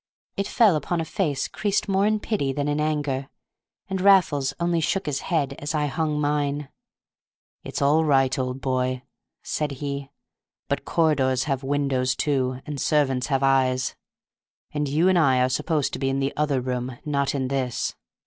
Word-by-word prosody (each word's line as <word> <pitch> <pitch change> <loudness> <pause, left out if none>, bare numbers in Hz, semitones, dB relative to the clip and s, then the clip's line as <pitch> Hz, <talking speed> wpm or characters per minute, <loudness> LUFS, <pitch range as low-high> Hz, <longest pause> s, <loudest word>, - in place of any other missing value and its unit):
It 200 - -1
fell 215 -7 +4
upon 165 +3 -1
a 165 - -1
face 155 -3 -1
creased 205 0 -1
more 195 +1 +2
in 215 0 +1
pity 200 -12 -1
than 145 +2 -2
in 145 +1 0
anger, 145 -3 -1 0.6
and 190 -1 -2
Raffles 175 -9 +4
only 170 0 +1
shook 165 +5 0
his 140 -2 -1
head 145 -6 -1
as 145 +2 -3
I 150 -1 +1
hung 150 0 -1
mine. 145 -1 -1 0.9
"It's - - -3
all 150 +3 +4
right, 135 -3 +2
old 130 +1 -3
boy," 130 -1 -1 0.4
said 150 -2 -2
he; 140 0 -5 0.6
"but - - -2
corridors 135 -6 +2
have 135 -3 -1
windows 135 -2 0
too, 130 -3 0
and 150 -2 -5
servants 135 -5 +1
have 135 -1 0
eyes; 130 -2 +2 0.8
and 150 -1 -1
you 155 +6 +2
and 185 -2 +4
I 135 -5 +4
are 125 0 +3
supposed 150 +2 0
to - - -4
be 135 0 0
in 135 0 0
the 135 0 -1
other 145 -3 +1
room, 125 0 -3
not 140 -2 0
in 130 -2 -1
this. 130 -3 -1
145 Hz, 175 wpm, -24 LUFS, 135-155 Hz, 0.9 s, fell